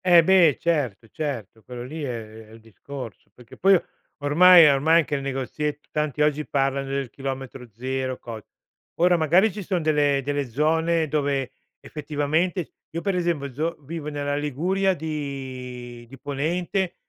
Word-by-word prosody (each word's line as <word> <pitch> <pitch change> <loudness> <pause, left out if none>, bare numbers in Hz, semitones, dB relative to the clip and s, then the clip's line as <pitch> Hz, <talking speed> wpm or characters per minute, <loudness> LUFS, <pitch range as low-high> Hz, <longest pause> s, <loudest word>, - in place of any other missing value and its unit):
Eh, 175 -2 +7
beh, 170 -5 +5
certo, 135 -10 -1
certo, 115 -8 -5
quello 120 +1 -8
lì 155 +6 -7
è 110 -4 -6
è - - -19
il 115 - -13
discorso, 115 +2 -10
perché 120 -2 -15
poi 195 -1 +5 0.4
ormai 170 +4 +8
ormai 155 +4 +4
che - - -6
il 140 - 0
negoziet 140 +2 -4
tanti 150 -1 0
oggi 150 0 +1
parlano 135 0 0
del 135 -3 -3
chilometro 135 -2 -6
0, 130 +3 -3
cos 115 -2 -8 0.5
ora 175 +1 +4
magari 175 +6 +4
ci 205 - -6
son 180 -3 -2
delle 145 -3 +2
delle 145 +1 -1
zone 160 +5 +1
dove 140 -3 -1 0.3
effettivamente 155 +4 -2 0.2
io 165 - -4
per 195 +1 0
esempio 165 -6 -1
zo 160 +5 -2
vivo 150 +1 -6
nella 145 -1 -2
Liguria 180 +7 0
di 130 -6 -6
di 135 - -11
Ponente, 175 +7 -2
145 Hz, 150 wpm, -24 LUFS, 135-165 Hz, 0.5 s, ormai